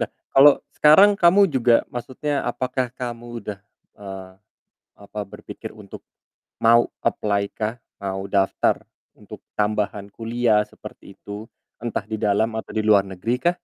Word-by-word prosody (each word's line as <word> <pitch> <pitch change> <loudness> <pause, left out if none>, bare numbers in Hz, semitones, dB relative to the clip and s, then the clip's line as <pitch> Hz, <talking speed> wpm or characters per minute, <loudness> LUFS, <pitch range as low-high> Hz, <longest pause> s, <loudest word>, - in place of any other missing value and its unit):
Lah, - - -2 0.2
kalau 140 +1 +8 0.2
sekarang 155 +7 +7
kamu 190 +3 +6
juga 120 -4 +4
maksudnya 135 +4 -3
apakah 125 0 -2
kamu 120 -2 -6 0.2
udah, 105 -1 -6 0.4
eee, 95 -2 -9 0.7
apa, 100 +1 -8
berpikir - - -10
untuk - - -11 0.6
mau 115 +1 +5
apply 100 -1 0
kah? 110 +1 -3 0.3
Mau 95 0 -4
daftar 95 -1 +2 0.4
untuk - - -12 0.2
tambahan 105 -1 -1
kuliah 115 -1 +1
seperti - - -13
itu? 105 +2 -8 0.3
Entah 115 -3 -3
di 110 +1 -4
dalam 105 +2 +1
atau 110 - -6
di 110 0 -1
luar 105 -2 +5
negerikah? 115 - -1
110 Hz, 130 wpm, -22 LUFS, 100-125 Hz, 0.7 s, kalau